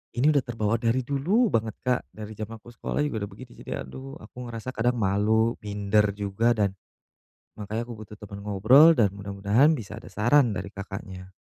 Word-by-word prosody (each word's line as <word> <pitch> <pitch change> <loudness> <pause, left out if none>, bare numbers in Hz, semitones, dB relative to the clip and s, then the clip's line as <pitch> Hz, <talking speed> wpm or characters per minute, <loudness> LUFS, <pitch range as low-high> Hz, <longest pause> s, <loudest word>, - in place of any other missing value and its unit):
ini 135 +6 +4
udah 145 - +4
terbawa 115 -3 -1
dari 120 +3 +1
dulu 180 - +1
banget, 110 -2 0
Kak, 125 -1 0
dari 110 0 -8
jam 110 0 -6
aku 120 +2 -14
sekolah 135 +5 -2
juga 110 -8 -2
udah - - -15
begitu, - - -12
jadi 70 -1 -5
aduh, 135 - -9
aku 125 0 -9
ngerasa 115 +2 -6
kadang 120 0 0
malu, 110 +2 +1
minder 105 0 +1
juga, 105 +4 +1
dan 100 -3 +1 0.8
makanya 110 +3 -4
aku 120 - -8
butuh 105 0 -11
temen 100 0 -9
ngobrol 110 - +6
dan 100 -4 +3
mudah-mudahan 100 +9 +2
bisa 110 0 -8
ada - - -12
saran 120 0 +3
dari 100 - -6
Kakaknya. 95 -1 -8
110 Hz, 185 wpm, -26 LUFS, 100-125 Hz, 0.8 s, ngobrol